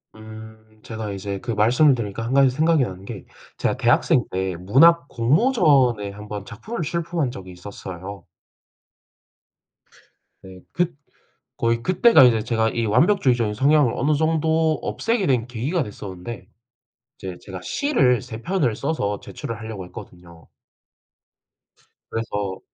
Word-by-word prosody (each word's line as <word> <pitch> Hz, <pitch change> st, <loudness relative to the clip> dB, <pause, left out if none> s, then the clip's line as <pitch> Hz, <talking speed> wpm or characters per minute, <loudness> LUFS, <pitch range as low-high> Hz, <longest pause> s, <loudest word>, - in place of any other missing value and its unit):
음 110 Hz, 0 st, -13 dB
제가 110 Hz, -2 st, -6 dB
이제 100 Hz, 0 st, -5 dB
그 120 Hz, -, -4 dB
말씀을 120 Hz, +7 st, +4 dB
들으니까 115 Hz, -3 st, -4 dB
1 120 Hz, +3 st, -3 dB
가지 135 Hz, -1 st, +5 dB
생각이 155 Hz, +2 st, +2 dB
나는 95 Hz, -4 st, -6 dB
게, 100 Hz, -3 st, -8 dB, 0.3 s
제가 -, -, 0 dB
대학생 -, -, +3 dB
때 95 Hz, 0 st, -2 dB
문학 145 Hz, -, +4 dB
공모전에 130 Hz, -, +2 dB
한번 105 Hz, 0 st, -8 dB
작품을 175 Hz, -, -7 dB
출품한 165 Hz, -2 st, -2 dB
적이 95 Hz, -6 st, -9 dB
있었어요. 95 Hz, +1 st, -9 dB, 2.2 s
네, 95 Hz, -1 st, -12 dB
그 175 Hz, -3 st, -1 dB, 0.6 s
거의 115 Hz, 0 st, 0 dB
그때가 185 Hz, -, +5 dB
이제 115 Hz, -4 st, +4 dB
제가 110 Hz, -1 st, +1 dB
이 115 Hz, 0 st, -2 dB
완벽주의적인 120 Hz, -, +2 dB
성향을 140 Hz, 0 st, +3 dB
어느 150 Hz, +4 st, +1 dB
정도 160 Hz, +1 st, +1 dB
없애게 225 Hz, -3 st, -1 dB
된 120 Hz, -3 st, +1 dB
계기가 130 Hz, +9 st, -2 dB
됐었는데 100 Hz, -1 st, -8 dB, 0.7 s
이제 95 Hz, -3 st, -7 dB
제가 95 Hz, -2 st, -8 dB
시를 130 Hz, -, +1 dB
3 110 Hz, +2 st, -9 dB
편을 170 Hz, -, 0 dB
써서 105 Hz, -9 st, -2 dB
제출을 115 Hz, -, -7 dB
하려고 110 Hz, -4 st, -7 dB
했거든요. 85 Hz, -2 st, -13 dB, 1.6 s
그래서 105 Hz, -4 st, -3 dB
115 Hz, 280 characters per minute, -22 LUFS, 100-150 Hz, 2.2 s, 가지